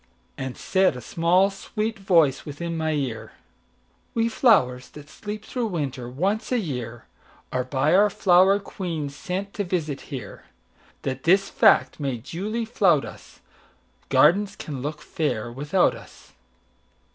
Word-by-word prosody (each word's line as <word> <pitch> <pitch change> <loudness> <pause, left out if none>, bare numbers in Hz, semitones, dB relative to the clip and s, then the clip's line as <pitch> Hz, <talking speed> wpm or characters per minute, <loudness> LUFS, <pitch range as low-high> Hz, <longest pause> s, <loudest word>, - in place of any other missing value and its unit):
And 130 -1 -5
said 190 -6 +2
a - - -6
small, 175 - +2
sweet 215 +2 -4
voice 165 -8 +3
within 165 +3 -5
my 160 -1 -1
ear:"We 145 - -5
flowers, 130 - +3
that 150 -1 -13
sleep 210 0 -7
through 245 -3 -2
winter, 135 - -4
once 195 - -1
a 250 - +3
yearAre 125 - -6
by 140 +4 +2
our 205 +3 +5
flower 190 0 +4
queen 170 -7 -5
sent 190 +7 -5
to 205 - -2
visit 165 -6 -2
here, 130 -8 -8 0.6
That 135 -1 -3
this 195 +5 +3
fact - - +4
may 135 -4 -2
duly 205 - -4
flout 180 -9 +3
us,—Gardens 195 +6 -1
can 140 -9 -6
look 150 +2 -5
fair 120 -7 -2
without 145 +9 +1
us. - - -14
165 Hz, 130 wpm, -24 LUFS, 135-195 Hz, 0.6 s, our